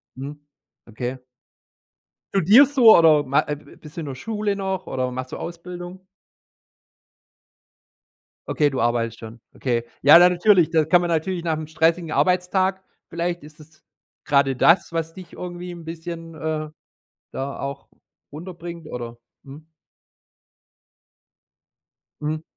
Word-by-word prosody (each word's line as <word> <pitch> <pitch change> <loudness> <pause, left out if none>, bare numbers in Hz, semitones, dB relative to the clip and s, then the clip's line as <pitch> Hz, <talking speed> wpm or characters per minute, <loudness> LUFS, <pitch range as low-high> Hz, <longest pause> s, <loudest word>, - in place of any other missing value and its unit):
mhm, 145 +2 -9 0.4
okay. 120 +3 -5 1.2
Studierst 220 - +5
du 235 -4 +9
oder 155 -3 +6
ma 140 +2 +2
äh, 150 - -2
bist 150 +1 -15
du 170 - -4
in - - -6
der 135 - -5
Schule 210 - -2
noch 190 -1 -3
oder 130 -1 -2
machst 130 +1 -6
du - - -5
Ausbildung? 175 +2 -8 2.5
Okay, 150 -3 +2
du 135 - -4
arbeitest 115 0 0
schon. 115 +1 -11
Okay. 120 -3 -1 0.2
Ja, 145 +4 +9
da 180 +1 +7
natürlich 180 -1 +4
da 160 -2 +2
kann 175 +2 +4
man 175 - -2
natürlich 170 +2 -1
nach 160 -2 -1
'nem 155 0 -6
stressigen 160 +1 0
Arbeitstag 185 +1 +1 0.3
vielleicht 170 0 -3
ist 150 +1 -15
es 155 0 -18 0.4
grade 140 -2 +2
das, 165 +5 +3
was 165 0 -3
dich 185 -2 -12
irgendwie 180 0 -7
'n 170 -1 -10
bisschen, 165 0 -7
äh, 155 -1 -4 0.6
da 135 +1 -5
auch 140 0 -6 0.5
runterbringt, 170 0 -8
oder? 120 -3 -7 0.3
Mhm. 150 +3 -13 2.6
Mhm. 155 +1 -3
160 Hz, 135 wpm, -22 LUFS, 145-175 Hz, 2.6 s, du